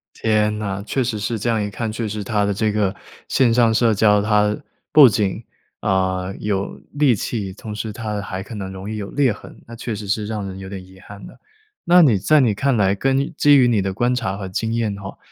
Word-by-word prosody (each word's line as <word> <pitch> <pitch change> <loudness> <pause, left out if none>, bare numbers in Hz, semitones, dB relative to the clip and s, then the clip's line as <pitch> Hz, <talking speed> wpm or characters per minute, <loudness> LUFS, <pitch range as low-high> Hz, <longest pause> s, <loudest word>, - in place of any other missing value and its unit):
天 105 -1 +1
呐， 100 -1 -3
确 130 - 0
实 115 -3 -2
是 110 +2 -2
这 120 - 0
样 110 -2 +1
一 105 - -2
看， 110 +2 -4
确 110 0 -3
实 105 0 -4
它 105 -1 0
的 100 0 0
这 105 +2 0
个 105 -2 0 0.3
线 125 -3 +3
上 115 -1 +3
社 115 0 +3
交， 105 0 +4
它， 105 0 +2 0.4
不 145 -4 +9
仅， 105 0 -1 0.4
啊， 95 0 0
有 100 -2 -3 0.2
戾 140 -6 +4
气， 100 -2 -4
同 105 +2 -8
时 110 +1 -4
它 105 -2 -4
还 95 -2 -5
可 115 - -10
能 95 -2 -6
容 95 +1 -8
易 110 - -4
有 100 -2 -5
裂 135 -5 +2
痕， - - -13
那 115 - -10
确 115 0 -5
实 105 0 -7
是 105 +1 -1
让 105 -2 -4
人 95 0 -8
有 95 - -8
点 95 -1 -7
遗 95 0 -17
憾 100 0 -12
呢。 - - -13 0.5
那 180 +1 +6
你 135 -11 +5
在 155 +11 +3
你 115 -6 +2
看 135 +4 +1
来， 100 -2 +2
根 135 +6 0
基 145 -1 +5
于 125 - +5
你 110 -5 +2
的 95 - -2
观 120 +5 0
察 110 -6 -2
和 95 -2 -6
经 115 +4 -2
验 110 -3 -1
的 100 - -10
话， 95 - -8
105 Hz, 260 characters per minute, -20 LUFS, 100-115 Hz, 0.5 s, 不